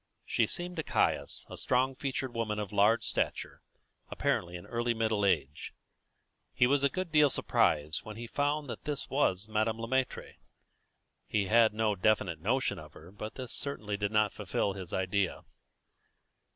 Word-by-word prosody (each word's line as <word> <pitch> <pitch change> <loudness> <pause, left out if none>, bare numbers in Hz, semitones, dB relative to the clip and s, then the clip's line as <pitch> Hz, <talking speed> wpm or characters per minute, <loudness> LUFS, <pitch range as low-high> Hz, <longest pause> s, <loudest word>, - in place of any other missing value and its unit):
She - - +2
seemed 175 0 -2
to 160 - -1
Caius - - 0
a - - -8
strong 130 +2 +1
featured 130 -1 -3
woman 110 -2 -2
of 105 -3 -4
large 105 +3 +4
stature, - - -2 0.5
apparently 85 0 -1
in 85 - -8
early 120 0 -1
middle 110 -2 0
age. 75 -7 0 0.8
He 125 - +5
was 140 +2 +2
a 140 - +4
good 185 0 -4
deal 150 -2 +6
surprised 75 - +1
when 110 0 -8
he 120 - -6
found 145 +4 -1
that 115 -3 -7
this 150 -2 -3
was 105 -8 +1
Madame 110 +1 0
Le 115 - -4
Maître. 130 +1 -2 0.9
He 105 -2 +1
had 95 - -4
had 115 -2 +6
no 110 -1 +1
definite 95 -4 +1
notion 125 +4 0
of 75 -1 -12
her, 85 +4 -13
but 105 +2 -7
this 130 -3 -4
certainly 105 -8 -2
did 100 0 -2
not 110 -1 +2
fulfil 100 -1 -1
his 95 -3 -7
idea. 95 +1 0
110 Hz, 170 wpm, -31 LUFS, 100-130 Hz, 0.9 s, deal